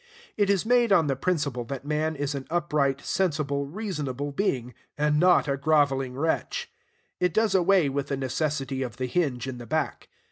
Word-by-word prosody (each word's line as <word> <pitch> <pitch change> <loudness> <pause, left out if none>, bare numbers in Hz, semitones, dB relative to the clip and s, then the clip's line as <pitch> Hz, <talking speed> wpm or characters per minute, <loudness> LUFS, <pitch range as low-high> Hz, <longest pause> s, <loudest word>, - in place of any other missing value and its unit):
It 205 -2 +2
is 200 0 +2
made 240 -1 +3
on 170 -5 +5
the 140 -2 0
principle 140 -5 -1
that 135 +2 -6
man 155 +1 0
is 145 0 -2
an 135 -2 -5
upright, 150 -5 0
sensible, 145 -6 -1
reasonable 145 - -4
being, 130 - -1 0.2
and 150 0 +2
not 180 -2 +5
a 140 0 0
groveling 135 -3 +2
wretch. 160 +3 -1 0.5
It 180 -2 +1
does 220 0 +3
away 185 -3 +4
with 140 0 -2
the 140 - -2
necessity 135 0 -2
of 125 -5 -4
the 130 - -2
hinge 125 -3 -1
in 130 -2 -5
the 120 - -9
back. 155 +4 -2
145 Hz, 180 wpm, -26 LUFS, 135-170 Hz, 0.5 s, on